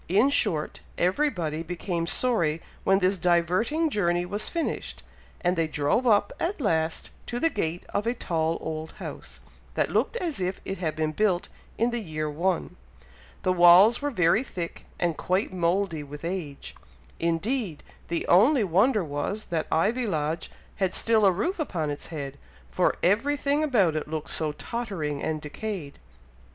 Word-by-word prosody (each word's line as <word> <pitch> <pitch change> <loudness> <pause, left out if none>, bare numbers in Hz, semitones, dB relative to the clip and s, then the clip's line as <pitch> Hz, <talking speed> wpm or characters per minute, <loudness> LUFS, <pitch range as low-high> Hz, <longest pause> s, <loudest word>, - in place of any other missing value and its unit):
In 215 +10 +4
short, 155 - +1 0.2
everybody 180 - 0
became 170 0 -3
sorry 170 -10 +1 0.2
when 195 - +4
this 190 0 +2
diverting 180 - +2
journey 175 -5 +1
was 205 +4 -2
finished, 335 -2 -3 0.4
and 180 +1 +2
they 165 -2 +1
drove 150 - +1
up, 205 -2 +3
at 345 +3 -1
last, 160 - 0 0.2
to 240 - -3
the 330 +3 +2
gate 175 -4 -2
of 205 +2 -1
a 240 - +1
tall 165 -6 -1
old 160 0 -5
house, - - -8 0.3
that - - +1
looked - - +1
as 335 - -3
if 185 +1 -2
it 195 - -4
had 160 -4 -2
been 155 -1 0
built 185 0 +1 0.3
in 235 +2 +2
the 240 - -1
year 155 -7 -3
one. 170 +4 -1 0.7
The 185 - +2
walls 185 +7 +7
were 290 - 0
very 180 -3 +3
thick, 175 -10 -6
and 170 -2 +1
quite 185 +4 -1
mouldy 175 -1 0
with 145 +2 -8
age. 170 -6 -5 0.5
Indeed, 170 - -1 0.2
the 170 0 -2
only 230 - +5
wonder 200 +5 +3
was, 160 +8 -3
that 160 -2 0
Ivy 225 +9 +2
Lodge 160 -2 -2 0.3
had 190 -2 0
still 220 -3 +4
a - - +6
roof 330 - -1
upon 165 - -1
its 145 - -6
head, 140 -3 -6 0.3
for - - +2
every 230 +11 +3
thing 285 +2 +1
about 205 - +3
it 155 - -2
looked 155 -1 -4
so 155 -2 -1
tottering 170 -9 -4
and 155 -1 -1
decayed. 155 0 -6
180 Hz, 165 wpm, -26 LUFS, 160-220 Hz, 0.7 s, walls